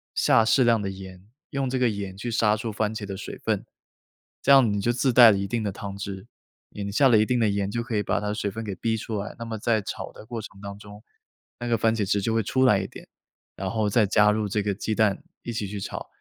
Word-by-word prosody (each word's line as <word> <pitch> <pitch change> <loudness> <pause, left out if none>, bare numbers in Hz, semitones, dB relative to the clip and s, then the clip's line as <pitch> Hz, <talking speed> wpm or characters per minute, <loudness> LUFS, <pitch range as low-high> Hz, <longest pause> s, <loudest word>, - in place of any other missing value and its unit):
下 115 - +4
适 130 +3 +4
量 115 -2 +4
的 100 - -2
盐， 95 -1 -10 0.3
用 135 -2 -1
这 130 0 -1
个 125 -2 +3
盐 100 -2 -5
去 120 +4 -4
杀 110 -1 +3
出 110 +1 -4
番 110 +1 -1
茄 110 - -5
的 100 -1 -6
水 - - -7
分， - - -1 0.8
这 140 - +3
样 125 -6 +6
你 100 - -1
就 120 - +2
自 125 +1 +1
带 120 -2 +9
了 100 - +1
一 100 - -2
定 115 +3 -1
的 105 - -1
汤 100 0 -7
汁， 100 +1 -6 0.4
你 100 -1 -5
下 135 +3 +5
了 115 - +6
一 110 - +3
定 125 +2 +1
的 110 -2 +3
盐 100 -1 -1
就 115 +1 -2
可 115 -2 -4
以 105 - +2
把 - - 0
它 105 - -2
的 - - -1
水 105 -1 -2
分 115 +3 -6
给 100 -3 -4
逼 110 +5 -1
出 110 0 -4
来， 100 - -6
那 - - -4
么 110 -1 -4
在 110 -1 +1
炒 - - -6
的 - - -13
过 115 -1 -5
程 100 -1 -12
当 100 0 -7
中， 105 +1 -13 0.6
那 120 - -4
个 115 -1 +2
番 115 0 +2
茄 105 -3 0
汁 100 -1 +2
就 110 +3 0
会 115 - +2
出 130 +5 +1
来 105 -5 +5
一 95 - -3
点， - - -13 0.5
然 95 -1 -3
后 110 -2 0
再 110 +1 +3
加 105 +1 +4
入 105 0 -1
这 105 +1 0
个 100 -1 0
鸡 110 +2 -2
蛋 105 -3 +2 0.2
一 120 - -4
起 105 -3 -3
去 105 +1 -6
炒， 100 - -6
105 Hz, 300 characters per minute, -25 LUFS, 100-115 Hz, 0.8 s, 带